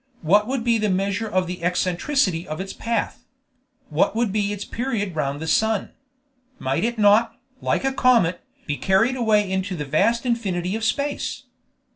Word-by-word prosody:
What 205 +6 +4
would 260 -2 -2
be 230 -1 +2
the 210 -1 +1
measure 200 +3 -1
of 185 -2 +1
the 180 -1 -6
eccentricity 180 - 0
of 155 +2 -5
its 190 +1 -5
path? 230 0 -3 0.7
What - - +1
would 230 -3 +1
be 205 0 0
its 205 0 -5
period 225 -7 -3
round 145 -2 -2
the 160 - -5
sun? 215 +5 +1 0.7
Might 135 +6 -1
it 235 +1 -1
not, 220 +3 +4 0.2
like - - 0
a 270 - +1
comet, 230 -10 +3 0.2
be 145 -2 -2
carried 225 +7 +2
away 215 -4 +2
into 190 0 -2
the 150 -3 -4
vast 230 - +1
infinity 195 -6 -1
of 225 - -4
space? 280 +6 -2
205 Hz, 170 wpm, -23 LUFS, 180-230 Hz, 0.7 s, What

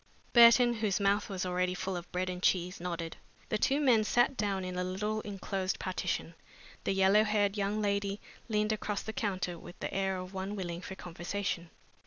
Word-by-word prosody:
Burton, 240 0 +8
whose 215 -4 0
mouth 200 +1 +2
was 190 -2 -3
already 180 0 0
full 190 +1 -3
of 175 0 -7
bread 180 +1 -1
and 180 0 -4
cheese, 180 0 +1
nodded. 170 -2 -4 0.3
The 215 - 0
two 275 +6 +2
men 245 -7 +4
sat 240 +5 +3
down 200 -4 -1
in 185 0 -4
a 180 - -1
little 210 +4 -2
enclosed 195 -2 -3
partition. 180 -2 -2 0.5
The - - +2
yellow 195 +2 +5
haired 210 -2 +1
young 205 +1 -1
lady 200 0 0 0.3
leaned 210 0 +1
across 210 -1 -2
the 220 - -5
counter 185 -5 -2
with 175 - -11
the - - -4
air 190 0 0
of 185 +1 -7
one 190 +2 -3
willing 175 -3 -4
for 190 - -7
conversation. 175 0 -4
195 Hz, 190 wpm, -31 LUFS, 180-210 Hz, 0.5 s, Burton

